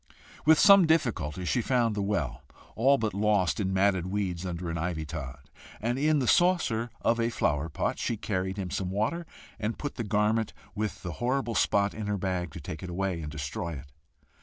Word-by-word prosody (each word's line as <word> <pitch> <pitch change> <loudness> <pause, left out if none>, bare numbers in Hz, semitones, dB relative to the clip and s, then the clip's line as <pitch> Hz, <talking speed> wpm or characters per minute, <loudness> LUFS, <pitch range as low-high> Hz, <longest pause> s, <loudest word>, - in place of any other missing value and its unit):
With 160 0 +7
some 200 -2 +7
difficulty 95 - 0
she 120 - +1
found 120 -2 +1
the 105 - -2
well, 100 -10 -1 0.3
all 135 +5 +4
but 110 -3 -1
lost 100 -2 +2
in 95 -2 0
matted 95 -2 +2
weeds 95 -2 -2
under 85 -1 -4
an 85 - -3
ivy 80 -2 -2
tod, 70 -1 -7 0.3
and 120 +4 -1
in 155 +1 +3
the 130 -4 0
saucer 165 -11 +3
of 115 0 +2
a 115 0 +2
flower 75 -8 0
pot - - -2
she 115 - -1
carried 95 -1 -2
him 95 -3 -4
some 95 -2 -2
water, 110 - -1 0.3
and 110 +1 -2
put 145 - -5
the 120 - -2
garment 105 +1 +1 0.2
with 105 0 -3
the 90 - -4
horrible 125 -1 0
spot 100 -1 +2
in 110 -1 -5
her 105 0 0
bag, 90 -2 -2
to - - -7
take 80 - -7
it 90 - -6
away 90 -1 -2
and 75 -1 -6
destroy 75 +3 -4
it. 70 -1 -9
100 Hz, 200 wpm, -28 LUFS, 90-115 Hz, 0.3 s, With